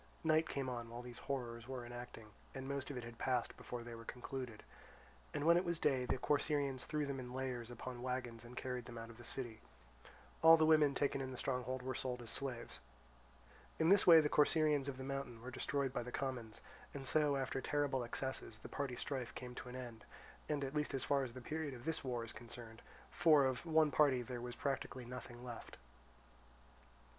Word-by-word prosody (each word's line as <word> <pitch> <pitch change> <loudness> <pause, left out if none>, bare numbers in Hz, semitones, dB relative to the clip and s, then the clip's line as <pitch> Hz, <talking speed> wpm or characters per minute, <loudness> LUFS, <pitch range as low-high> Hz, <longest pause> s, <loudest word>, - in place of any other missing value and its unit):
Night 160 0 +4
came 135 -2 -2
on 120 -2 -3
while 120 +1 -6
these 120 -1 -8
horrors 120 -3 -3
were 130 -2 -4
enacting, 120 -2 -8 0.2
and 135 0 -4
most 140 0 -2
of 140 - -4
it 125 - -4
had 115 0 -9
passed 125 -2 0
before 120 -1 -6
they 120 0 -7
were 115 0 -8
concluded. 125 -1 -6 0.7
When 160 +4 +5
it 175 - +3
was 170 -2 0
day 135 -5 +2
the 125 - +1
Corcyraeans 145 -2 +1
threw 150 -1 0
them 140 -1 -3
in 125 0 -6
layers 125 -3 -2
upon 120 +1 -6
wagons 125 -2 -3
and 120 +1 -11
carried 125 -2 -3
them 120 -1 -8
out 115 0 -6
of 115 - -14
the - - -9
city. 120 -3 -4 0.8
All 165 0 +10
the 160 - +5
women 155 -3 +6
taken 140 -1 +1
in 130 - -3
the 130 - -6
stronghold 125 0 -1
were 130 0 -2
sold 125 -1 -3
as 115 - -3
slaves. 130 -4 -3 1.0
In 160 +1 +4
this 200 0 +6
way 165 -2 +11
the 150 - +2
Corcyraeans 150 -1 +4
of 135 -2 -3
the 130 - -5
mountain 135 -3 -4
were 125 +3 -7
destroyed 135 +1 -1
by 125 - 0
the 125 +1 -6
commons; 125 -6 -3 0.3
and 135 -1 -5
so 150 +1 +3
after 135 0 -1
terrible 145 -3 +1
excesses 130 -2 -2
the - - -10
party 140 -3 -2
strife 130 -2 -3
came 125 -1 -6
to 125 - -7
an 125 - -7
end, 120 -3 -7 0.5
at 140 -2 -1
least 150 -2 0
as 135 - -1
far 140 -1 +3
as 125 -3 -5
the 130 - -7
period 150 +1 -3
of 120 - -11
this 160 -2 -1
war 125 -3 -1
is 115 - -6
concerned, 115 -1 -8 0.3
for 155 -5 +6
of 130 +5 -1
one 155 -2 +5
party 135 -3 +4
there 120 0 -5
was 120 0 -5
practically 135 -2 -2
nothing 125 0 -8
left. 120 -2 -7
130 Hz, 205 wpm, -38 LUFS, 120-140 Hz, 1.0 s, way